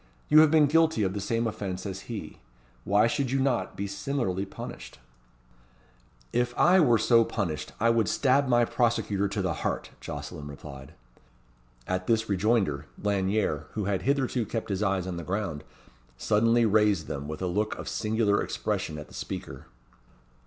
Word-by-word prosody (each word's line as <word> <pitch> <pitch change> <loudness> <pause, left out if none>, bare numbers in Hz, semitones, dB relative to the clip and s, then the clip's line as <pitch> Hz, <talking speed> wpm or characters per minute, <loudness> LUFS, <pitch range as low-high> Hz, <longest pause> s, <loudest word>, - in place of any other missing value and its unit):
"You 155 - +8
have 155 -1 +7
been 155 -1 +5
guilty 160 -5 +3
of 95 -1 0
the 100 - -3
same 115 +4 -1
offence 95 -4 -4
as 95 +2 -6
he. 115 -3 -6 0.5
Why 100 +2 +4
should 135 +2 0
you 135 +2 0
not 130 -2 0
be 100 - -2
similarly 100 -2 -2
punished?" - - -9 1.4
"If 120 0 0
I 185 +2 +5
were 120 -9 +5
so 115 +1 +4
punished, 95 -9 -3
I 115 +2 +4
would 115 -3 +2
stab 135 0 +2
my 120 -1 +4
prosecutor 110 -5 0
to 100 0 -3
the 90 - 0
heart," - - -2
Jocelyn 75 - -7
replied. 70 -2 -10 0.9
At 95 0 -2
this 115 -1 +2
rejoinder, 100 - +1
Lanyere, 100 -6 0
who 105 -2 -2
had 100 -1 0
hitherto 135 -3 0
kept 110 +1 -4
his 100 0 -2
eyes 95 -3 0
on 90 -2 -4
the 85 - -5
ground, 90 -6 -3 0.5
suddenly 115 - +3
raised 105 -5 +3
them, 70 0 -5
with 80 +4 -5
a - - +1
look 105 +4 -1
of - - -8
singular 105 -1 +1
expression 75 - -3
at 75 - -8
the - - -17
speaker. - - -7
105 Hz, 165 wpm, -27 LUFS, 95-120 Hz, 1.4 s, You